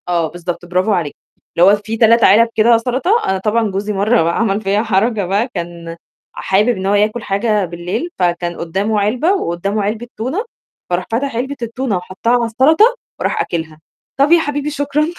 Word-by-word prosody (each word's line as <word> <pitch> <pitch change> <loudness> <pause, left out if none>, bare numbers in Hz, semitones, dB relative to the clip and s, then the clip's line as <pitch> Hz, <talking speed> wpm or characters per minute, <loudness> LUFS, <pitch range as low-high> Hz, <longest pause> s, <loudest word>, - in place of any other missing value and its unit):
آه، 170 -2 +1
بالضبط 175 0 -6
برافو 185 +4 0
عليكِ، 165 -6 -2 0.4
اللي 175 +2 +6
هو - - +5
في 215 +2 -5
3 230 +1 +4
علب 225 +4 +5
كده 230 +1 +5
سَلطة، 255 - -1 0.2
أنا 190 - +1
طبعًا 215 +2 0
جوزي 205 +2 -3
مرّة 205 +2 +2
بقى 170 +1 0
عمل 215 -2 0
فيّا 205 +1 0
حركة 215 0 0
بقى، 200 +6 0
كان 170 -1 -6 0.4
حابب 200 +5 +1
إن 190 -6 -1
هو 195 - +1
ياكُل 215 +3 +1
حاجة 205 0 0
بالليل، 175 - -4
فكان 175 -1 -1
قدّامه 195 +6 -1
علبة 245 - +1
وقدّامه 200 - -2
علبة 220 +4 -3
تونة، 270 - -3 0.4
فراح 180 0 -1
فتح 255 +2 -1
علبة 265 +4 -3
التونة 235 -2 -2
وحطّها 185 +5 -3
على 240 -1 +2
السَلطة 310 - +4 0.2
وراح - - -1
أكلها، 160 -2 -4 0.4
طَب 280 +3 +3
يا 340 - +7
حبيبي 290 -1 -2
شكرًا. 290 0 -1
210 Hz, 180 wpm, -16 LUFS, 185-240 Hz, 0.4 s, يا